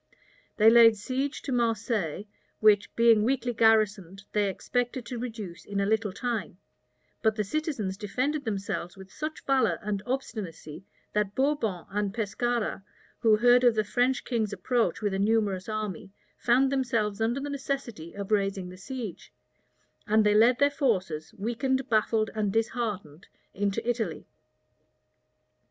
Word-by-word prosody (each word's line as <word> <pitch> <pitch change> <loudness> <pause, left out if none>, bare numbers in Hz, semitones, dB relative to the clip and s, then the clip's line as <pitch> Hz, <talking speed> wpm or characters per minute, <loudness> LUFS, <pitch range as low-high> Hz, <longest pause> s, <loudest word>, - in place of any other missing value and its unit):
They 220 +1 +7
laid 230 -2 +7
siege 265 +7 -3
to 275 - -4
Marseilles, 225 - -1 0.3
which, 210 -2 +4
being 230 -2 +5
weakly 250 0 0
garrisoned, 210 -4 +2
they 205 -1 +1
expected 245 +4 -2
to 240 0 -5
reduce 220 -8 -6
in 200 -1 -4
a 200 - +1
little 215 0 +1
time; 225 -3 -3 0.6
but 220 -1 +2
the 210 - 0
citizens 220 - -3
defended 255 +8 -2
themselves 195 -4 -4
with 190 -1 -12
such 305 +1 -6
valor 270 -1 +2
and 200 -1 -2
obstinacy, 195 - -5 0.3
that 210 -1 0
Bourbon 260 - 0
and 205 0 -2
Pescara, 230 -1 -1 0.4
who 225 -3 +5
heard 245 +3 +5
of 240 -2 +5
the 215 - +2
French 245 +5 +1
king's 220 -4 -1
approach 240 -1 0
with 205 -2 0
a 195 - -1
numerous 205 -2 +1
army, 215 -4 -4 0.3
found 260 +3 +3
themselves 230 -6 0
under 235 +4 +1
the 285 +1 -4
necessity 270 - -5
of 200 0 -6
raising 195 -3 0
the 185 - -11
siege; 235 -2 -7 0.8
and 215 0 +4
they 210 - +4
led 230 +4 +5
their 285 +1 +3
forces, 185 - -1
weakened, 260 +5 -1
baffled, 220 0 +2
and 210 -2 -1
disheartened, 210 - -3 0.3
into 200 +3 -2
Italy. 225 -10 -2
220 Hz, 145 wpm, -28 LUFS, 200-245 Hz, 0.8 s, They